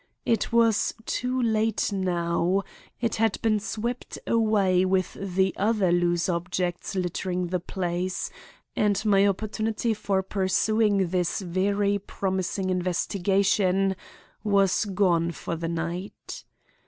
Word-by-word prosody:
It 230 Hz, 0 st, +1 dB
was 230 Hz, -2 st, +3 dB
too 255 Hz, +1 st, -1 dB
late 220 Hz, -2 st, +1 dB
now. 180 Hz, 0 st, 0 dB, 0.4 s
It 230 Hz, -2 st, -1 dB
had 220 Hz, -1 st, +1 dB
been 215 Hz, -2 st, +3 dB
swept 220 Hz, +4 st, -4 dB
away 205 Hz, -5 st, +3 dB
with 185 Hz, -1 st, +1 dB
the 190 Hz, 0 st, 0 dB
other 205 Hz, -3 st, +2 dB
loose 175 Hz, -1 st, +2 dB
objects 175 Hz, +1 st, -2 dB
littering 180 Hz, 0 st, -2 dB
the 180 Hz, 0 st, 0 dB
place, 180 Hz, +1 st, -3 dB, 0.4 s
and 205 Hz, -2 st, +2 dB
my 200 Hz, -1 st, +5 dB
opportunity 215 Hz, +3 st, -1 dB
for 200 Hz, -2 st, -1 dB
pursuing 200 Hz, 0 st, +1 dB
this 180 Hz, +2 st, 0 dB
very 200 Hz, +3 st, 0 dB
promising 190 Hz, -1 st, -2 dB
investigation 190 Hz, +1 st, +1 dB, 0.5 s
was 200 Hz, -1 st, +3 dB
gone 180 Hz, -4 st, +1 dB
for 165 Hz, -, -4 dB
the 165 Hz, 0 st, -3 dB
night. 170 Hz, +4 st, -5 dB
190 Hz, 115 wpm, -26 LUFS, 180-210 Hz, 0.5 s, my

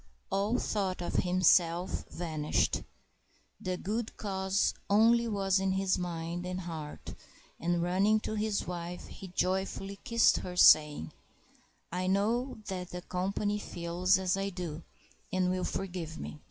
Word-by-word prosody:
All 200 Hz, +5 st, +1 dB
thought 195 Hz, -6 st, -1 dB
of 175 Hz, -, -2 dB
himself 180 Hz, 0 st, +3 dB
vanished. 155 Hz, -3 st, 0 dB, 0.8 s
The 185 Hz, 0 st, -2 dB
good 220 Hz, +5 st, -3 dB
cause 190 Hz, -1 st, 0 dB, 0.2 s
only 230 Hz, +3 st, +5 dB
was 195 Hz, -3 st, +1 dB
in 190 Hz, 0 st, +1 dB
his 190 Hz, -1 st, +1 dB
mind 170 Hz, 0 st, -3 dB
and 185 Hz, +1 st, -4 dB
heart, 160 Hz, -4 st, -7 dB, 0.5 s
and, 175 Hz, 0 st, 0 dB
running 195 Hz, +5 st, +3 dB
to -, -, -4 dB
his 215 Hz, -1 st, -1 dB
wife, 175 Hz, 0 st, -5 dB
he 195 Hz, -, -10 dB
joyfully 190 Hz, +2 st, -2 dB
kissed 230 Hz, 0 st, +4 dB
her, 180 Hz, -1 st, -5 dB
saying, 150 Hz, -, +6 dB, 0.8 s
"I 180 Hz, +1 st, -1 dB
know 225 Hz, +7 st, +1 dB
that 185 Hz, -2 st, -4 dB
the 180 Hz, 0 st, -6 dB
company 200 Hz, +3 st, -1 dB
feels 180 Hz, 0 st, +1 dB
as 185 Hz, -1 st, +1 dB
I 195 Hz, 0 st, -1 dB
do, 175 Hz, -4 st, -5 dB, 0.5 s
and 185 Hz, -1 st, +1 dB
will 185 Hz, 0 st, -1 dB
forgive 175 Hz, -4 st, -4 dB
me." 150 Hz, -, -7 dB
185 Hz, 140 wpm, -31 LUFS, 175-200 Hz, 0.8 s, saying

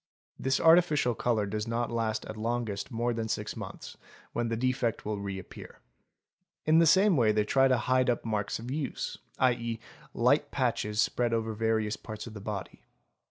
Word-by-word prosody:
This 135 Hz, 0 st, +1 dB
artificial 160 Hz, -6 st, +5 dB
colour 110 Hz, -2 st, 0 dB
does 105 Hz, +2 st, -3 dB
not 115 Hz, +1 st, -1 dB
last 110 Hz, -2 st, -1 dB
at 110 Hz, -, -7 dB
longest 115 Hz, -1 st, -2 dB
more 120 Hz, 0 st, -1 dB
than 115 Hz, -1 st, -3 dB
six -, -, -3 dB
months, -, -, -8 dB, 0.4 s
when 120 Hz, 0 st, -1 dB
the 115 Hz, 0 st, -1 dB
defect 125 Hz, -2 st, 0 dB
will 105 Hz, -1 st, -2 dB
reappear. 100 Hz, -2 st, -7 dB, 0.9 s
In 155 Hz, +1 st, +5 dB
the 165 Hz, -, +5 dB
same 190 Hz, +3 st, +5 dB
way 115 Hz, -6 st, +4 dB
they 105 Hz, 0 st, +1 dB
try 135 Hz, +4 st, +4 dB
to 130 Hz, -1 st, +3 dB
hide 130 Hz, +2 st, +2 dB
up 120 Hz, -, 0 dB
marks 105 Hz, -2 st, -1 dB
of 120 Hz, +3 st, -7 dB
use, 145 Hz, -2 st, -3 dB, 0.2 s
7.e., 115 Hz, -3 st, +1 dB, 0.4 s
light -, -, +3 dB
patches 105 Hz, 0 st, -1 dB
spread 120 Hz, 0 st, +2 dB
over 110 Hz, -1 st, -2 dB
various 110 Hz, -1 st, 0 dB
parts 110 Hz, -1 st, -8 dB
of 115 Hz, -, -9 dB
the 105 Hz, -, -8 dB
body. 100 Hz, -4 st, -6 dB
115 Hz, 175 wpm, -29 LUFS, 110-125 Hz, 0.9 s, artificial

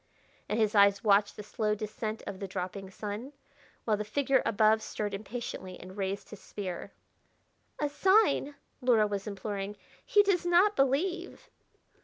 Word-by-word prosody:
And 210 Hz, -, 0 dB
his 215 Hz, -2 st, +2 dB
eyes 200 Hz, 0 st, +5 dB
watched 205 Hz, -1 st, +4 dB
the 210 Hz, -, -7 dB
slow 210 Hz, 0 st, -1 dB
descent 215 Hz, +1 st, -5 dB
of 190 Hz, -, -6 dB
the 195 Hz, -, -4 dB
dropping 190 Hz, +1 st, -5 dB
sun, 210 Hz, +7 st, -6 dB, 0.5 s
while 215 Hz, -2 st, +2 dB
the 210 Hz, -, -2 dB
figure 270 Hz, +5 st, +1 dB
above 215 Hz, +1 st, +4 dB
stirred 210 Hz, -1 st, -4 dB
impatiently 200 Hz, -2 st, -6 dB
and 185 Hz, +1 st, -11 dB
raised 195 Hz, 0 st, -3 dB
his 210 Hz, -, -10 dB
spear. 185 Hz, -4 st, -6 dB, 0.9 s
"A 295 Hz, -, +1 dB
sign!" 295 Hz, -1 st, +3 dB, 0.3 s
Luhra 240 Hz, -4 st, +4 dB
was 200 Hz, 0 st, -4 dB
imploring. 200 Hz, 0 st, -4 dB, 0.3 s
"He 420 Hz, -5 st, +4 dB
does 390 Hz, -3 st, +2 dB
not 355 Hz, +4 st, +4 dB
believe!" 335 Hz, +7 st, 0 dB
215 Hz, 150 wpm, -30 LUFS, 200-275 Hz, 0.9 s, eyes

